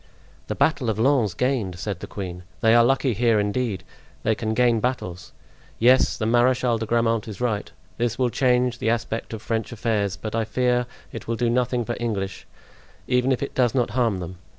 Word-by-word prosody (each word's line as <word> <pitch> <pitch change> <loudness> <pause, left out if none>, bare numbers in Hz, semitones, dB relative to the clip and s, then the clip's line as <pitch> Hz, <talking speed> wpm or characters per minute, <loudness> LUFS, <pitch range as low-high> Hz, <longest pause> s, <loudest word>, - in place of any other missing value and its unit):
"The - - -3
battle 145 -7 +1
of 110 - -1
Lens 115 -6 +2
gained!" 115 -7 -1
said 95 0 -4
the - - -7
queen; 90 -3 -6 0.2
"they 110 0 +5
are 120 0 +7
lucky 130 +1 +2
here 115 0 +3
indeed; 105 0 -1 0.4
they 110 - +2
can 110 0 -2
gain 120 -2 +3
battles! 95 -8 -3 0.5
Yes, 125 +3 +4
the 110 - -2
Marechal 120 0 +3
de 110 - -3
Grammont 115 -1 +1
is 105 -3 -7
right; 115 -4 -1 0.3
this 120 -1 0
will 125 -2 +1
change 125 0 +2
the 110 - 0
aspect 115 -1 -2
of 110 -1 -6
French 115 0 -2
affairs, 105 -4 -1
but 110 - -6
I 115 - +1
much 110 - -1
fear 125 +1 +1 0.2
it - - -8
will 115 - 0
do 120 0 +1
nothing 125 -1 0
for 120 - -3
English, 100 -5 -3 0.6
even 125 +1 +2
if 130 - 0
it 140 - -5
does 125 -1 +2
not 125 -3 +1
harm 120 -6 +1
them. 90 +1 -7
115 Hz, 200 wpm, -24 LUFS, 110-125 Hz, 0.6 s, are